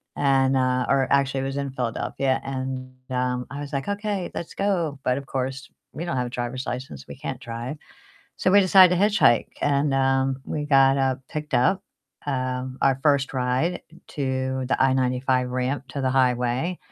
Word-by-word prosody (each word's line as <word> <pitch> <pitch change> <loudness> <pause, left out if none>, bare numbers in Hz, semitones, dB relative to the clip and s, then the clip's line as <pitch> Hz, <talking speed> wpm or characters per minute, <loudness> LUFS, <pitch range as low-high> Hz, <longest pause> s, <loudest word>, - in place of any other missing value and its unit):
and, 135 -1 +3
uh 130 -1 +1
Or 135 -1 +3
actually 135 -1 +2
it - - -3
was 135 +1 -3
in 140 -1 -2
Philadelphia. 130 +1 -1
And, 130 -1 -5 0.2
um, 125 -1 -1
I 140 - -6
was 145 0 -7
like, 135 -1 -2
"Okay, 205 -2 -2
let's 170 - -5
go." 175 -8 -1
But 125 0 +1
of 140 - -6
course 130 0 -4 0.2
we 165 - -5
don't 155 -7 -2
have 125 -1 0
a - - -6
driver's 120 +2 -4
license, 100 - -6
we - - -8
can't 135 -2 -6
drive. 120 +3 -5 0.6
So 185 - +1
we 200 +2 +7
decided 185 -1 +6
to - - 0
hitchhike, 205 - +4
and, 140 0 +1
um, 135 0 +1
we 150 - -3
got, 135 -2 +5
uh, 135 -1 +1
picked 150 -1 -6
up, 185 +11 +3 0.4
um, 130 -1 -2
our 135 -1 +3
1st 140 -3 +2
ride 130 +8 0 0.3
to 130 -1 -2
the 130 - +1
I-95 130 -1 +1
ramp 130 +2 -2
to 140 +3 -5
the 130 -1 +1
highway. 125 +5 +1
135 Hz, 180 wpm, -24 LUFS, 130-145 Hz, 0.6 s, we